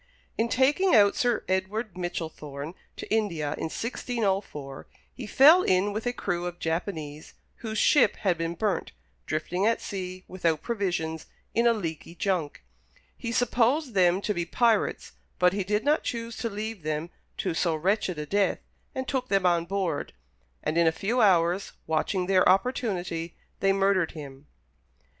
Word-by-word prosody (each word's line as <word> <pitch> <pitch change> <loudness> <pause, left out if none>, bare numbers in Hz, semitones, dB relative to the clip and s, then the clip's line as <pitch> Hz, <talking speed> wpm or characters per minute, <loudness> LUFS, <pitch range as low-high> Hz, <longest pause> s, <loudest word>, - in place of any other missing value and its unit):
In 230 +1 0
taking 285 +9 +3
out 200 -2 +6
Sir 240 -3 +1
Edward 190 +2 -2
Michellthorne 160 -4 -5 0.2
to - - -6
India, 170 -10 0
in - - -4
1604, 195 - -3 0.3
he 245 -5 -7
fell 300 - +7
in 195 - +2
with 220 +3 -3
a - - +2
crew 180 -7 -2
of 175 0 -6
Japanese, 160 -3 -4 0.2
whose 220 -2 -5
ship 290 - +4
had 190 -4 +1
been 165 0 -3
burnt, 205 +2 -1 0.3
drifting 175 +6 -1
at 230 - +2
sea, 185 -1 -6
without 165 -4 -1
provisions, 175 -8 -2 0.3
in 235 +1 +3
a 235 - +5
leaky 170 -5 -5
junk. 175 - -2 0.5
He 230 - -5
supposed 245 +3 +1
them 185 0 +3
to 210 - -1
be 175 - -1
pirates, 225 +6 +1 0.3
but 180 0 +4
he 200 -1 -1
did 210 +3 0
not 300 +2 +3
choose 230 -1 -4
to 230 - -2
leave 215 -1 -5
them 155 +2 -3 0.3
to 185 - -1
so 165 0 +1
wretched 185 +1 0
a 150 - -4
death, 200 +5 +1 0.4
and 260 0 -3
took 255 -1 -1
them 195 -2 +2
on 170 -1 +3
board; 185 -5 -2 0.5
and 160 +2 0
in 170 - +4
a - - +5
few 220 +9 0
hours, 180 -1 +3
watching 160 +4 0
their 185 0 +4
opportunity, 185 -6 0 0.2
they 195 - +3
murdered 195 -3 +2
him. 140 -3 -10
190 Hz, 160 wpm, -27 LUFS, 165-220 Hz, 0.5 s, fell